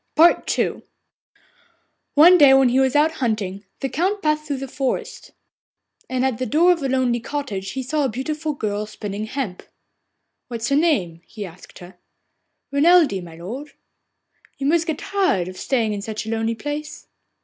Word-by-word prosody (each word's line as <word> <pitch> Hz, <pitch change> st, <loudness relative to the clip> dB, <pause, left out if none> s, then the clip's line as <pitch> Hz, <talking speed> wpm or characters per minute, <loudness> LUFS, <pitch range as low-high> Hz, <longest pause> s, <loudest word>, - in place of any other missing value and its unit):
II -, -, -1 dB, 1.3 s
One 345 Hz, +5 st, +8 dB
day 275 Hz, -2 st, +8 dB
when 270 Hz, -2 st, +5 dB
he 255 Hz, +2 st, +2 dB
was 265 Hz, 0 st, +2 dB
out 300 Hz, +2 st, +4 dB
hunting 205 Hz, -4 st, -2 dB, 0.2 s
the 270 Hz, -, 0 dB
Count 375 Hz, -, -1 dB
passed 305 Hz, 0 st, +1 dB
through 275 Hz, -2 st, -3 dB
a -, -, -5 dB
forest, 265 Hz, 0 st, -3 dB, 0.8 s
and 255 Hz, 0 st, 0 dB
at 260 Hz, -4 st, -1 dB
the 255 Hz, -, -2 dB
door 340 Hz, +5 st, +4 dB
of 340 Hz, -3 st, 0 dB
a 270 Hz, -, -1 dB
lonely 255 Hz, -2 st, +1 dB
cottage 220 Hz, -8 st, -4 dB
he 265 Hz, -, -3 dB
saw 300 Hz, +4 st, -1 dB
a 270 Hz, -, +1 dB
beautiful 300 Hz, +6 st, -3 dB
girl 210 Hz, -5 st, -3 dB
spinning 210 Hz, 0 st, -5 dB
hemp. 220 Hz, -6 st, -4 dB, 0.9 s
'What 235 Hz, -2 st, -6 dB
is 235 Hz, -, -2 dB
your 280 Hz, -, +4 dB
name?' 185 Hz, -, 0 dB
he 210 Hz, -3 st, -7 dB
asked 180 Hz, 0 st, -13 dB
her. 180 Hz, 0 st, -13 dB, 0.7 s
'Renelde, 285 Hz, -, +4 dB
my 165 Hz, -2 st, -11 dB
lord.' 245 Hz, -, -8 dB, 0.8 s
'You 275 Hz, -, -4 dB
must 330 Hz, +3 st, +2 dB
get 315 Hz, -3 st, -1 dB
tired 375 Hz, -, 0 dB
of 185 Hz, 0 st, -8 dB
staying 230 Hz, -5 st, 0 dB
in 205 Hz, -, -4 dB
such 215 Hz, +1 st, -5 dB
a 220 Hz, -, -4 dB
lonely 225 Hz, 0 st, -1 dB
place? 295 Hz, +5 st, -6 dB
260 Hz, 170 wpm, -22 LUFS, 215-300 Hz, 1.3 s, One